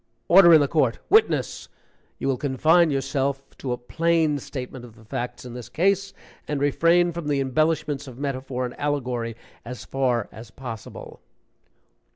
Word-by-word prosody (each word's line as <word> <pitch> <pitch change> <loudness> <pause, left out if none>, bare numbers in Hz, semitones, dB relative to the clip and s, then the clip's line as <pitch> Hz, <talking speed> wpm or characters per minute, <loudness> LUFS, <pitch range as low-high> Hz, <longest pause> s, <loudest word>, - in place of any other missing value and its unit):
"Order 175 -1 +8
in 155 - +6
the 145 - +2
court! 135 -6 +1
Witness, 435 +2 +2 0.5
you - - -3
will 135 - +2
confine 155 +5 +3
yourself 135 0 -2
to 130 - -4
a 125 - -1
plain 160 +3 +1
statement 130 -1 -7
of 115 -3 -13
the 110 - -18
facts 125 +1 -5
in 125 - -8
this 120 -1 -8
case, 195 +7 +1 0.4
and 150 -1 -2
refrain 170 +5 +3
from 170 -2 -6
the 145 -2 +1
embellishments 145 +1 0
of 125 -2 -10
metaphor 130 -2 -3
and 125 - -6
allegory 125 -5 -2 0.3
as 125 +1 -8
far 125 -5 0
as 110 +1 -11
possible." 115 -2 -9
135 Hz, 160 wpm, -24 LUFS, 125-155 Hz, 0.5 s, Order